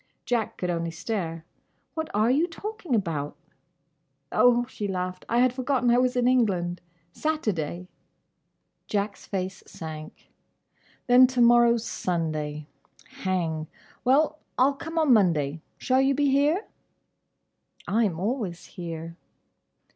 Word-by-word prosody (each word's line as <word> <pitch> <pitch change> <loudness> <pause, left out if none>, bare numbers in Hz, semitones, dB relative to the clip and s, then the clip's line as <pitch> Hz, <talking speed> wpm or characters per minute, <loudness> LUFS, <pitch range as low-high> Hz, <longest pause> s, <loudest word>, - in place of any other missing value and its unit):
Jack 235 -3 -1
could 180 -1 -1
only 170 -1 -2
stare. 165 -2 -4 0.5
"What 320 -1 -3
are 215 +3 +2
you 305 +6 +3
talking 370 - -4
about?" 160 -8 -2 1.0
"Oh," 245 0 +4
she 215 -4 -5
laughed, 185 -1 -4
"I 235 - +1
had 255 -1 +3
forgotten 255 -1 +1
I 240 - +5
was 255 0 +2
in 245 -1 +2
England. 185 -9 +1 0.3
Saturday." 185 - -2 1.0
Jack's 205 0 -2
face 190 -1 -3
sank. 155 -1 -9 0.7
"Then 250 +1 +7
to 255 -1 -3
morrow 235 0 +6
's 230 - -6
Sunday. 155 -6 -2 0.5
Hang. 165 -4 -1 0.4
Well! 300 +4 +3 0.2
I'll 270 +3 +4
come 325 +4 -7
on 310 -5 +5
Monday. 165 -8 +2 0.2
Shall 260 +1 +2
you 270 0 +3
be 285 0 +2
here?" 295 +9 +2 1.2
"I 225 +3 +2
am 170 -5 -2
always 195 -5 -2
here." 165 -1 -7
215 Hz, 125 wpm, -26 LUFS, 170-255 Hz, 1.2 s, Then